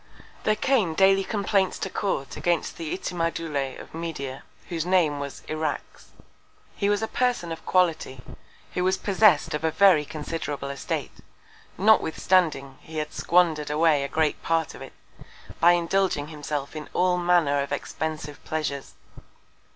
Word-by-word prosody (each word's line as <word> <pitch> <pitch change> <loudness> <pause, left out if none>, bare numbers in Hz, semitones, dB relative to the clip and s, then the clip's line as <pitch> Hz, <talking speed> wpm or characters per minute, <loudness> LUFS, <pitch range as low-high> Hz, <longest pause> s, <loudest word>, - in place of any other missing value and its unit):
There 215 - +3
came 215 -11 +1
daily 195 +1 +5
Complaints 200 -2 0
to - - -3
Court 140 -10 -2
against 175 -2 0
the 165 -2 -5
Itimadoulet 165 -7 -2
of - - -12
Media, 160 -5 -5 0.3
whose 165 -3 -2
Name 170 -5 +2
was 140 -1 -6
Irax. 155 -1 -4 0.7
He 200 - 0
was 205 +1 +1
a - - 0
Person 245 -9 0
of 165 - -6
Quality, 165 -7 +1 0.5
who 180 - 0
was 190 +1 +2
possess'd 200 -5 +3
of 150 - -3
a 160 - +3
very 165 -1 +5
considerable 150 -2 -5
Estate, 140 - -4 0.7
notwithstanding 170 -8 +2
he 160 0 -9
had 150 0 -3
squander'd 165 -4 +2
away 150 -1 +3
a - - -2
great 155 0 0
Part 165 -1 0
of - - -12
it, - - -9 0.7
by 175 +2 +6
indulging 175 -3 0
himself 150 -2 -5
in 155 -1 -7
all 180 0 +2
Manner 170 -5 +3
of 140 - -5
expensive 150 0 -4
Pleasures. 145 -3 -4
165 Hz, 145 wpm, -25 LUFS, 150-185 Hz, 0.7 s, by